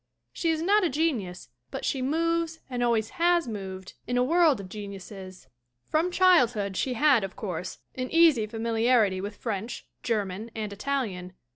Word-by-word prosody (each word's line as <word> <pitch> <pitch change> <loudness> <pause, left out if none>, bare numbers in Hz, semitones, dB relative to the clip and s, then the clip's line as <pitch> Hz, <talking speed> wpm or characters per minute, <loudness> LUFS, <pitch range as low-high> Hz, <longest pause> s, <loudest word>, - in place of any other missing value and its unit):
She 335 - -1
is 320 0 0
not 410 +3 +4
a 350 - +2
genius 250 - -2 0.2
but - - -5
she 265 - -1
moves 330 +3 0
and 245 -1 -2
always 230 -2 +1
has 345 -2 +3
moved 190 -4 -6
in 245 +1 0
a 245 - +4
world 315 -2 +4
of 195 - -7
geniuses. 195 -3 -9 0.4
From 320 +3 +2
childhood 245 - +3
she 250 +5 -1
had, 275 -4 +4
of 195 -1 -5
course, 185 -3 -5 0.2
an 255 0 -4
easy 320 -10 +5
familiarity 225 -3 +2
with 205 +1 -5
French, 225 0 -4 0.2
Ger 220 -4 0
man 195 +5 -7
and 215 -2 -4
Italian. 200 -7 -3
230 Hz, 165 wpm, -27 LUFS, 200-310 Hz, 0.4 s, easy